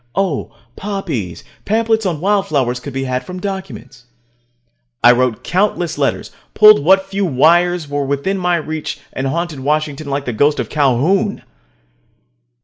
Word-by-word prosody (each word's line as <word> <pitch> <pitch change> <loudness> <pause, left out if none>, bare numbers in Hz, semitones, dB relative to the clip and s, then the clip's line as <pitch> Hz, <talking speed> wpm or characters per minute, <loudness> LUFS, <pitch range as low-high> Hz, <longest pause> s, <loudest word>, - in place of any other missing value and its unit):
Oh, 175 - -1 0.2
poppies. 170 - -4 0.2
Pamphlets 220 0 +1
on 160 -5 -3
wildflowers 155 -11 0
could 140 - -8
be 135 +1 -3
had 130 -1 -2
from 180 +6 -8
Documents. 190 -10 -7 1.0
I 120 - +9
wrote 125 -2 0
countless 180 -3 0
letters, - - -1 0.2
pulled 215 -8 +7
what 190 +4 +4
few 195 +1 -3
wires 170 +2 +3
were 145 0 -2
within 140 +8 -1
my 180 -1 +1
reach, 155 -2 -4
and 135 - -2
haunted 165 0 -3
Washington 150 +1 -2
like 140 0 -2
the 125 - -3
ghost 145 +6 +2
of - - -3
Calhoun. 155 - +1
155 Hz, 140 wpm, -17 LUFS, 135-190 Hz, 1.0 s, I